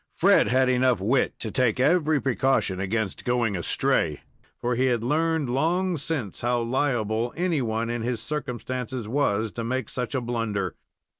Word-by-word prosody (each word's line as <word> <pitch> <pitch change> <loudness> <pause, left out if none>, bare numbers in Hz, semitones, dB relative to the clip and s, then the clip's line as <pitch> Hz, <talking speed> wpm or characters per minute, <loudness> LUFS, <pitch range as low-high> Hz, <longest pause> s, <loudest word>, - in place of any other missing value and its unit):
Fred - - +4
had 130 +1 +3
enough 125 -3 +3
wit 120 +7 +1
to 110 - -5
take 125 0 +1
every 155 +1 +3
precaution 130 -7 +1
against 100 +1 -2
going 120 -4 +1
astray, 85 - 0 0.4
for 120 +1 -1
he 130 +2 +2
had 120 -3 +1
learned 160 +2 +1
long 170 +8 +1
since 140 - -3
how 120 0 +1
liable 120 -2 0
any 170 -4 +1
one 115 0 -1
in 120 -1 -2
his 120 0 -2
circumstances 125 -3 -4
was 110 -4 0
to 115 - -5
make 125 0 -2
such 125 +2 -3
a 130 - 0
blunder. 115 -6 -2
125 Hz, 160 wpm, -25 LUFS, 115-135 Hz, 0.4 s, Fred